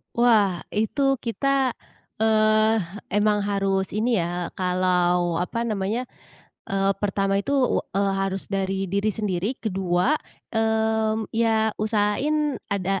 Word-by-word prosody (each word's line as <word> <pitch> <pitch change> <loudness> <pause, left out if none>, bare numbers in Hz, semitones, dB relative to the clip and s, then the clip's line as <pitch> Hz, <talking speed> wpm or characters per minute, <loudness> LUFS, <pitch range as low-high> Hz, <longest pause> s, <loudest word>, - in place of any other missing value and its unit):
Wah, 210 -7 +3
itu 270 +5 +1
kita, 265 +2 0 0.5
eee, 215 0 +4 0.4
emang 210 +1 +2
harus 195 -1 0
ini 230 +3 +1
ya, 175 +1 -3
kalau 180 -1 +1
apa 230 +7 -2
namanya? 215 +4 -2 0.6
Eee, 195 0 +1
pertama 195 -1 +1
itu, 280 +7 -2 0.3
wa - - -15
eee, 200 0 +2
harus 195 0 -2
dari 195 -1 -2
diri 200 +2 +1
sendiri. 210 +2 -2
Kedua, 190 +2 0 0.4
mmm, 220 -1 0
ya 220 -1 +2
usahain 240 +8 0
ada 195 -1 -1
210 Hz, 115 wpm, -24 LUFS, 195-225 Hz, 0.6 s, eee